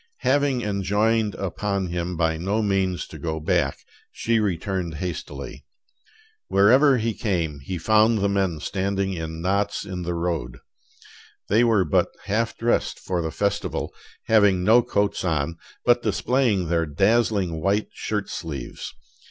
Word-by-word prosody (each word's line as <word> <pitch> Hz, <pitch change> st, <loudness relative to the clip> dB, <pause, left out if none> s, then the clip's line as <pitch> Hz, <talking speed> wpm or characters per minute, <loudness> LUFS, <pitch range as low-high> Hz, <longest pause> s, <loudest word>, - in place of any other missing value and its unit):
Having 135 Hz, -2 st, +2 dB
enjoined 105 Hz, +2 st, +1 dB
upon 100 Hz, +1 st, -2 dB
him 85 Hz, 0 st, -3 dB
by 80 Hz, -1 st, +1 dB
no 100 Hz, +7 st, -1 dB
means 95 Hz, -3 st, 0 dB
to -, -, -11 dB
go 80 Hz, -1 st, -3 dB
back, 75 Hz, -, 0 dB, 0.3 s
she 115 Hz, 0 st, 0 dB
returned 95 Hz, -3 st, -2 dB
hastily. 85 Hz, 0 st, -6 dB, 0.8 s
Wherever 130 Hz, +8 st, +5 dB
he 115 Hz, -1 st, -1 dB
came 85 Hz, -10 st, -2 dB
he 70 Hz, +7 st, -5 dB
found 110 Hz, +5 st, +4 dB
the 100 Hz, -1 st, +1 dB
men 95 Hz, -5 st, 0 dB
standing 95 Hz, +1 st, -1 dB
in 80 Hz, -1 st, -5 dB
knots 100 Hz, +2 st, 0 dB
in 95 Hz, -2 st, -5 dB
the 85 Hz, 0 st, -3 dB
road. 85 Hz, -8 st, -2 dB, 0.9 s
They 110 Hz, +4 st, +4 dB
were 110 Hz, -6 st, +3 dB
but 75 Hz, -, +2 dB, 0.2 s
half 115 Hz, +3 st, -1 dB
dressed 120 Hz, +1 st, 0 dB
for 90 Hz, -2 st, -2 dB
the 80 Hz, -, -2 dB
festival, 100 Hz, +4 st, -2 dB, 0.3 s
having 100 Hz, -5 st, +4 dB
no 115 Hz, +5 st, +6 dB
coats 100 Hz, -4 st, -1 dB
on, 80 Hz, -2 st, -1 dB, 0.3 s
but 120 Hz, 0 st, +4 dB
displaying 120 Hz, -10 st, +1 dB
their 85 Hz, -1 st, +1 dB
dazzling 95 Hz, -1 st, +1 dB
white 100 Hz, +4 st, +1 dB
shirt 105 Hz, -2 st, -3 dB
sleeves. 75 Hz, -9 st, -6 dB
100 Hz, 140 wpm, -24 LUFS, 85-110 Hz, 0.9 s, no